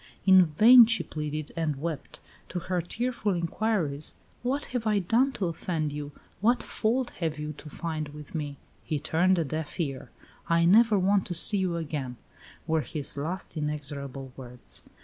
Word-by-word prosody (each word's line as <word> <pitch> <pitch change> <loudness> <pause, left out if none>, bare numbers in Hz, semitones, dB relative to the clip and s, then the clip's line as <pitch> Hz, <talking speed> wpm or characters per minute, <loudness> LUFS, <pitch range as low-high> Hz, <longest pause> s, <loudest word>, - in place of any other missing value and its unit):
In 190 -2 +8
vain 225 +9 +8
she 230 0 +1
pleaded 150 -1 -5
and 160 -3 -1
wept. 155 +1 -5 0.3
To - - -4
her 180 0 -1
tearful 225 +2 -2
inquiries, 170 -4 0 0.3
"What 265 +4 -1
have 235 -3 -1
I 210 -1 +3
done 230 +8 +2
to 205 -6 -2
offend 160 -3 -2
you? 145 0 -5 0.3
What 235 +5 +2
fault 240 +3 -1
have 160 -3 -1
you 150 0 -4
to 155 - -10
find 155 -1 -4
with 150 0 -11
me?" 145 -3 -4 0.3
he 155 - -2
turned 180 +6 +2
a 165 - +1
deaf 155 +4 -5
ear. 135 -6 -3 0.4
"I 170 0 +4
never 215 +4 +6
want 195 +1 +2
to 175 - -3
see 205 +4 +4
you 185 -2 0
again," 145 -6 -4 0.5
were 160 0 +1
his 145 -1 -3
last 170 +6 -4
inexorable 140 -3 -5
words. 125 -2 -6
165 Hz, 170 wpm, -28 LUFS, 150-200 Hz, 0.5 s, In